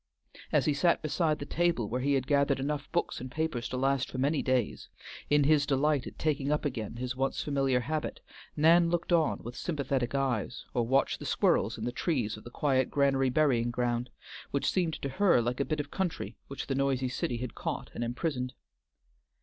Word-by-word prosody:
As - - +3
he 150 - +3
sat 170 +4 +2
beside 155 0 +1
the 145 - -6
table 170 -9 +1
where 125 +4 -2
he 140 +1 +2
had 130 -2 0
gathered 140 -1 +2
enough 145 +1 -3
books 175 -6 -1
and 130 - -6
papers 135 -3 -2
to 130 - -3
last 135 0 +1
for - - -6
many 140 +3 +1
days, 130 -4 -1 0.4
in 145 0 +4
his 145 0 +4
delight 140 0 +2
at - - -10
taking 145 -2 0
up 150 +1 0
again 115 -6 -3
his 125 +1 -3
once 135 +1 -1
familiar 135 -3 +1
habit, 155 +4 -3 0.4
Nan 165 +3 +5
looked 175 +1 0
on 165 -2 +2
with 120 +2 -7
sympathetic 140 -6 -2
eyes, 130 -3 -1
or 120 -3 0
watched 135 +3 +2
the - - -7
squirrels - - +2
in - - -6
the 120 - -1
trees 125 - -1
of 110 - -12
the - - -9
quiet 130 0 +1
Granary 135 -2 +2
Burying 125 -4 +2
Ground, 120 0 -1 0.4
which 140 - 0
seemed 170 -4 0
to - - 0
her 185 -1 +4
like 120 +2 -1
a 140 - +1
bit 155 -1 -2
of 145 0 -4
country 190 -3 -3
which 140 - -5
the 135 - -2
noisy 135 -1 +1
city 125 -1 -2
had 125 0 -5
caught - - -4
and 120 - -3
imprisoned. 125 +1 -2
135 Hz, 205 wpm, -30 LUFS, 125-150 Hz, 0.4 s, Nan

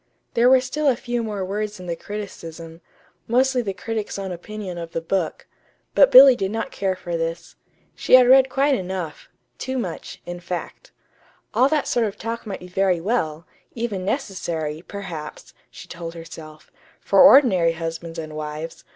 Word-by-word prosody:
There 235 +2 +4
were 260 0 +6
still 290 +4 -2
a 265 - +4
few 240 0 -3
more 210 -4 -3
words 210 +1 -4
in 180 - -9
the 170 -1 -3
criticism, 165 -5 -8 0.5
mostly 255 +2 +2
the 205 -4 -3
critic's 215 +2 -4
own 195 -1 -4
opinion 185 0 -7
of 170 0 -8
the - - -1
book; 165 0 -2 0.5
but - - +6
Billy 265 0 +10
did 195 -4 -2
not 225 +2 -3
care 190 -1 -1
for 175 -2 -5
this. 165 0 -4 0.4
She - - +4
had 255 -1 +7
read 265 +1 +6
quite 275 +2 +2
enough 185 - -4 0.3
boo 260 0 -3
much, 180 -9 -5
in 175 0 -6
fact. 175 0 -7 0.6
All 260 - +4
that 305 -1 0
sort 235 -2 +1
of 200 - -7
talk 230 0 -5
might 195 - -5
be 180 - -9
very 185 -1 +1
well, 165 -5 -2 0.3
even 225 -5 -3
necessary, 165 -6 -3
perhaps 175 -6 -8 0.2
(she - - -12
told 170 0 -7
herself), 155 -2 -11 0.3
for 195 - +3
ordinary 240 - +6
husbands 165 0 -6
and 155 -1 -6
wives! 155 +1 -6
190 Hz, 170 wpm, -22 LUFS, 165-235 Hz, 0.6 s, Billy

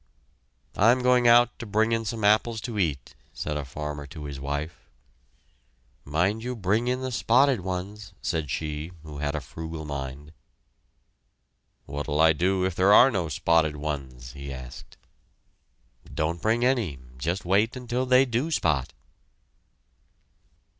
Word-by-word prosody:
"I 110 +4 +5
am 125 0 +1
going 125 -1 +4
out 120 0 +5
to - - -6
bring 110 +2 +1
in 115 0 0
some 110 +1 -4
apples 110 +2 +3
to 115 -4 -4
eat," 70 -9 -1 0.2
said 75 - -4
a 75 - -2
farmer 75 +1 -6
to 75 +2 -9
his 70 -2 -6
wife. 70 +4 -5 1.2
"Mind 90 +10 0
you 125 +1 -3
bring 110 +3 0
in 125 +1 0
the 130 0 -3
spotted 125 +3 +3
ones," 95 +2 -5
said 80 -4 -2
she 75 +3 -4
who 75 -2 -9
had 75 +1 -2
a - - -1
frugal 80 0 -7
mind. 70 +1 -6 1.5
"What'll 75 +1 -3
I 80 0 +6
do 95 +4 +1
if 95 - -1
there 95 +4 +3
are 125 +5 +8
no 90 -7 -1
spotted 80 +1 +2
ones?" 70 -5 -5
he 70 -1 -8
asked. 65 -2 -10 1.1
"Don't 80 +2 -2
bring 115 +5 +2
any 115 - +1 0.2
just 90 +9 -2
wait 105 +7 +2
until 125 0 -2
they 130 +1 +5
do 125 +5 -1
spot!" 75 - 0
90 Hz, 145 wpm, -26 LUFS, 75-115 Hz, 1.5 s, are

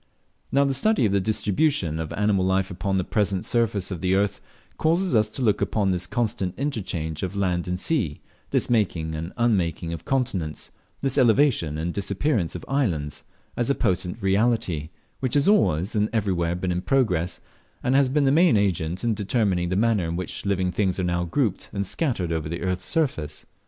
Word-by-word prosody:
Now 140 +1 +4
the 140 -1 +1
study 210 - +2
of 105 - +2
the 100 - +3
distribution 105 - +1
of 80 -1 -4
animal 105 -2 +1
life 95 +1 +1
upon 95 +2 -1
the 95 - +1
present 100 -2 -1
surface 110 -5 0
of 90 -4 -4
the 95 0 +2
earth, 100 +1 0 0.4
causes 170 +4 +2
us 110 -2 +3
to 130 - -5
look 105 -4 +2
upon 100 -3 +1
this 90 0 -1
constant 110 -6 -2
interchange 90 - -3
of 95 +1 -3
land 90 -3 0
and 90 0 -2
sea 105 - -1 0.3
this - - +1
making 90 -9 0
and 80 +3 -5
unmaking 90 -8 0
of 85 - -6
continents, 110 - -2 0.3
this 135 0 +2
elevation 120 - +3
and 85 +2 -2
disappearance 100 - -1
of 90 - -7
islands 85 - -1 0.3
as 120 +1 0
a 140 - +3
potent 95 0 -1
reality, 95 -6 +1 0.3
which 130 -1 -1
has 145 +3 +3
always 100 - +3
and 105 0 +2
everywhere 90 -6 0
been 90 +1 -2
in 90 0 -1
progress, 100 -10 +1 0.4
and 125 - +1
has 135 -1 +4
been 145 +2 +2
the 135 - +4
main 165 -4 +5
agent 90 -3 0
in 115 -1 +2
determining 100 -4 0
the 90 - 0
manner 105 -3 +2
in 85 - -3
which 90 +2 -4
living 95 -2 +1
things 95 -1 0
are - - 0
now 85 0 0
grouped 105 - -1
and 100 -1 -1
scattered 100 - -1
over 80 -2 -2
the 85 +1 -4
earth's 90 0 -1
surface. 80 - -1
100 Hz, 190 wpm, -24 LUFS, 90-120 Hz, 0.4 s, main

